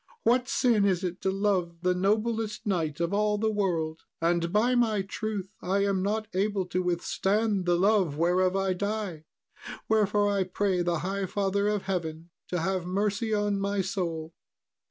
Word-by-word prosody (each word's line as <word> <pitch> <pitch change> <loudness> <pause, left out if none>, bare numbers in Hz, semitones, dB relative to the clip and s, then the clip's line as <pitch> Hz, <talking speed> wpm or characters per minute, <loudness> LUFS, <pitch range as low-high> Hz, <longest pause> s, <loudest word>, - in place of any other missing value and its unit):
What 250 +2 +3
sin 235 -6 +3
is 190 -2 +2
it 180 0 -3
to 190 - +1
love 190 -4 0
the 180 0 +3
noblest 215 +3 0
knight 165 -7 -1
of 170 +2 -1
all 210 0 +2
the 220 +1 +1
world? 170 -6 -1 0.2
And, 170 0 +1
by 220 +5 +3
my 220 -5 +2
truth, 205 0 -4
I 200 +2 +1
am 195 -2 +1
not 215 +2 -1
able 195 0 0
to 185 - 0
withstand 190 +3 0
the 175 0 +3
love 190 -6 +2
whereof 180 +3 +2
I 195 -1 +1
die; 200 -4 -3 0.6
wherefore, 210 -1 +3
I 200 -2 +1
pray 185 0 0
the 170 -2 0
High 195 0 -2
Father 200 +1 0
of 210 -2 0
Heaven 170 -3 -4 0.2
to 180 -2 -2
have 185 +1 -1
mercy 205 +4 0
on 205 -1 +1
my 200 0 0
soul." 170 -4 -3
195 Hz, 170 wpm, -28 LUFS, 180-210 Hz, 0.6 s, What